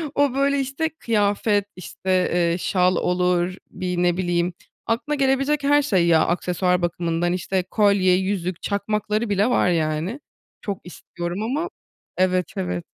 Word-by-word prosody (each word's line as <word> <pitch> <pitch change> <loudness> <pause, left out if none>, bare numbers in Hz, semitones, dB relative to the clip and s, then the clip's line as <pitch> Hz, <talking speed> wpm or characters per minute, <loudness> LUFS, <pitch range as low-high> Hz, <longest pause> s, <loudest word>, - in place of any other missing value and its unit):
O, 285 -2 +2
böyle, 280 +1 +2
işte, 275 +4 -1
kıyafet, 205 -7 0
işte, 185 +1 -8 0.2
eee, 170 -1 +2
şal 180 0 +2
olur, 180 +1 +1
bir 180 -1 -2
ne 175 0 +2
bileyim 175 -1 0 0.3
aklına 250 +6 -1
gelebilecek 275 +1 +1
her 290 +1 +4
şey 190 -11 +2
ya 165 -2 +4
aksesuar 180 +1 0
bakımından, 175 0 -1
işte, 185 +1 -1
kolye, 200 -1 +3
yüzük, 185 -2 -2
çakmakları 210 +2 -1
bile 205 +4 +2
var 215 - +3
yani, 165 - -1 0.4
çok 200 -3 -4
istiyorum 175 +1 -6
ama 295 +10 -2 0.5
Evet, 185 -2 +1
evet. 90 -1 -3
185 Hz, 140 wpm, -22 LUFS, 175-225 Hz, 0.5 s, her